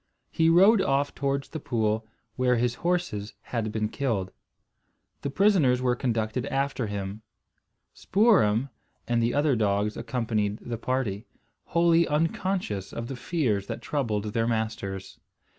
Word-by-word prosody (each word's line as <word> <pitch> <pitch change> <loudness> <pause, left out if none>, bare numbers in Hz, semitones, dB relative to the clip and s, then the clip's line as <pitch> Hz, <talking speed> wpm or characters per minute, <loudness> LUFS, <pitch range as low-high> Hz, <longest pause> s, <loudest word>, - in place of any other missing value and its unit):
He 160 0 +3
rode 195 +5 +6
off 140 -5 +1
towards 140 0 -2
the 160 - -5
pool, 110 -4 -1 0.3
where 125 -1 +2
his 120 +1 +1
horses 170 - -1
had 115 -3 -3
been 110 0 -1
killed. 110 -7 -2 0.9
The 140 - -2
prisoners 155 -7 +3
were 125 -1 +1
conducted 115 -1 -1
after 135 -3 -1
him. 100 +1 -5 0.7
Spoor'em 150 - +3 0.4
and 120 -1 +1
the 115 +3 +1
other 145 -2 +3
dogs 105 -1 +1
accompanied 110 -4 -1
the 115 -1 -6
party, 125 -4 -2 0.4
wholly 170 0 +3
unconscious 155 - -1
of 115 0 -5
the 135 - -4
fears 120 - -1
that - - -5
troubled 110 -7 -2
their 115 -1 +1
masters. 110 -4 -3
120 Hz, 135 wpm, -27 LUFS, 110-145 Hz, 0.9 s, rode